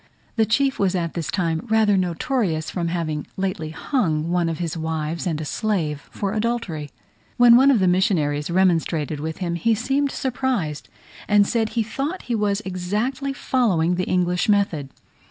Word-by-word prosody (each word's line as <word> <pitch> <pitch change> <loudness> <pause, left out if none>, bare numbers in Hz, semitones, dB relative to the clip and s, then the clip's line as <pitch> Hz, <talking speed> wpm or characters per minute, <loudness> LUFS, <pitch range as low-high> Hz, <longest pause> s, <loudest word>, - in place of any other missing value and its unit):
The 220 -2 +2
chief 270 +4 +1
was 190 -1 +2
at 170 -2 -2
this 170 -3 -4
time 165 -4 -1
rather 220 -2 +4
notorious 180 - -1
from 175 -2 -2
having 165 -3 -2
lately 185 -5 -2
hung 165 - -1
one 175 -1 +1
of 165 - -3
his 170 -2 -3
wives 160 +1 -3
and 160 -3 -1
a 155 - -4
slave 160 -7 -2
for 200 -1 -3
adultery. 215 -10 -2 0.5
When 240 -1 +8
one 265 +3 +6
of 270 - +5
the 190 -3 +2
missionaries 175 -6 +1
remonstrated 165 -4 +1
with 160 +1 -4
him 175 -3 -2
he 220 +7 +1
seemed 270 +5 0
surprised, 245 - -2 0.4
and 205 -1 +5
said 225 0 0
he 225 0 0
thought 280 - -4
he 245 - -3
was 210 -2 0
exactly 215 +9 -2
following 210 -11 +1
the 180 +1 -1
English 180 +1 +1
method. 185 -9 +1
185 Hz, 170 wpm, -22 LUFS, 160-225 Hz, 0.5 s, When